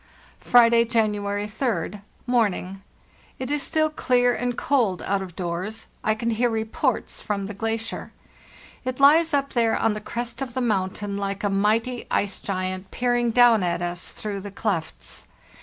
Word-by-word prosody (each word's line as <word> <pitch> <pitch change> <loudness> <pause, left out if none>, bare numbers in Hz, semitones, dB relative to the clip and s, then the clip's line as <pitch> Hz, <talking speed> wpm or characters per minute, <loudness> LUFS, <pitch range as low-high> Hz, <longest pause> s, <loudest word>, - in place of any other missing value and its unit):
"Friday, 235 -1 +6
January 210 -3 0
3d. 210 - -2 0.2
Morning. 200 -6 0 0.6
It 260 +1 -4
is 295 -1 0
still 310 +1 +1
clear 245 -4 +2
and 245 0 -2
cold 230 -10 +1
out 200 0 0
of 180 -3 -8
doors; 185 +5 -4
I 215 - +2
can 230 +2 -1
hear 240 +2 +2
reports 220 -1 -1
from 200 -2 -2
the 210 - -6
glacier. 225 +2 -3 0.7
It 255 0 -3
hes 310 +4 +6
up 280 -1 0
there 230 -2 +2
on 225 -1 +2
the 210 - -5
crest 240 +4 -5
of 255 -2 -4
the - - 0
mountain 200 -3 -1
like 200 0 -3
a 205 - +1
mighty 225 +5 +1
ice 200 0 0
giant 185 0 -3
peering 245 -1 +1
down 235 -2 +6
at 175 -1 -1
us 175 0 -3
through 205 -2 -5
the 205 - -7
clefts. 195 -5 -4
220 Hz, 160 wpm, -24 LUFS, 200-245 Hz, 0.7 s, Friday